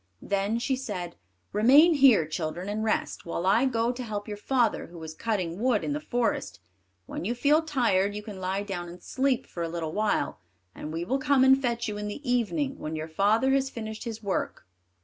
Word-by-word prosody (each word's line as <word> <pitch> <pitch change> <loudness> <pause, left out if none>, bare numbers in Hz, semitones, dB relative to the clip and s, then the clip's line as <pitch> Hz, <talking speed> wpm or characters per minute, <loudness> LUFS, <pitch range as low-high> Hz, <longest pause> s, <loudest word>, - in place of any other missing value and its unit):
Then 200 +3 0
she 255 +3 0
said, 180 -10 -5 0.4
"Remain 275 - +6
here, 265 - +6
children, 160 +3 -4
and 210 +1 -2
rest, 220 - -1
while 170 +1 -3
I 210 +7 +4
go 235 -2 +1
to 250 +1 -6
help 210 -3 -4
your 210 - -4
father, 235 +2 0
who 170 -1 -11
is 160 0 -7
cutting 185 -4 -2
wood 245 -3 +2
in 290 - -1
the 295 - -2
forest; 245 - -2 0.5
when - - -6
you 230 +6 -1
feel 295 +5 +4
tired, 230 -10 +1
you 210 - -5
can 205 -3 -8
lie 190 +2 -1
down 180 -4 -5
and 175 +1 -12
sleep 265 -1 0
for 170 - -7
a 165 - -1
little 165 -2 -3
while, 215 0 0 0.3
and 150 - -7
we 165 +2 -3
will 265 +8 0
come 265 0 +3
and 265 +1 +6
fetch 240 -2 -1
you 210 -1 -4
in 210 - -4
the 260 +7 -7
evening, 265 +4 0
when 155 +1 -4
your 155 0 -4
father 210 +10 +2
has 270 0 +2
finished 220 -2 -6
his 225 -1 -6
work." 200 -2 -2
215 Hz, 210 wpm, -27 LUFS, 190-260 Hz, 0.5 s, Remain